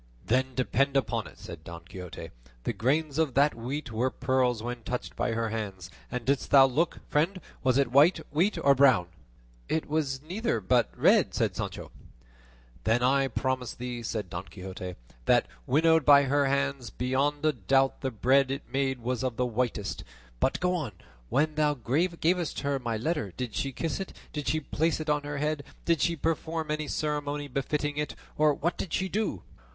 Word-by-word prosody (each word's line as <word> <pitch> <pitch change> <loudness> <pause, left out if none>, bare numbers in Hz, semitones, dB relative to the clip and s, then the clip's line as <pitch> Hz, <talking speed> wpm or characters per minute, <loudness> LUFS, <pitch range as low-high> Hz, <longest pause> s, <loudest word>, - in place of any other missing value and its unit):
"Then 130 +5 +1
depend 135 +2 +2
upon 115 -5 -1
it," - - -15
said 85 -3 -9
Don 85 0 -9
Quixote, 90 -1 -8 0.3
"the - - -1
grains 145 +4 0
of 155 -6 +1
that 145 +2 +4
wheat 125 +4 -5
were 120 +4 +1
pearls 125 -3 +1
when 120 0 -4
touched 125 +2 -4
by 115 - 0
her 115 0 -1
hands; 100 -5 -5 0.2
and 125 -2 -4
didst 140 0 +1
thou 135 -1 +8
look, 150 +6 -1
friend? 170 +6 +1 0.2
was 130 -1 +3
it 140 -4 +2
white 145 +7 +6 0.2
wheat 180 +8 +2
or 140 - +7
brown?" 130 -10 +4 0.6
"It 160 - 0
was 145 -3 -1
neither, 180 - -1
but 120 +3 +2
red," - - +4
said - - 0
Sancho. - - -5 0.9
"Then 115 +2 +2
I 135 +2 +3
promise 130 0 -2
thee," 125 -1 -5
said 110 -3 -3
Don 90 +2 -4
Quixote, 90 0 -7 0.3
"that, - - +4 0.2
winnowed 160 +2 +4
by 140 0 +7
her 140 +1 +2
hands, 140 -3 0
beyond 135 +6 0
a 155 - +4
doubt 135 +5 +2
the 135 - 0
bread 130 +3 +3
it 135 +1 -3
made 135 -1 -1
was 125 +2 -2
of 125 -3 -2
the 125 - +2
whitest; 120 -4 -2 0.4
but 135 - +1
go 180 0 +1
on; 150 - -2 0.4
when 155 +2 +2
thou 150 -1 +2
gavest 165 +6 0
her 140 -1 0
my 115 -3 -2
letter, 115 - -2
did 125 -4 -4
she 135 - -1
kiss 160 +7 -3
it? 195 - -5 0.2
Did 150 -2 -4
she 155 +1 +1
place 160 +2 0
it 155 -1 -1
on 150 0 +1
her 145 0 -4
head? 150 0 -1 0.2
Did 170 -3 +2
she 170 - +2
perform 160 0 -2
any 155 0 -2
ceremony 145 -1 -2
befitting 145 +2 -2
it, 150 0 -2 0.2
or 150 0 +4
what 170 +5 -2
did 170 - -4
she 190 - +1
do?" 195 - -2
135 Hz, 185 wpm, -28 LUFS, 120-150 Hz, 0.9 s, thou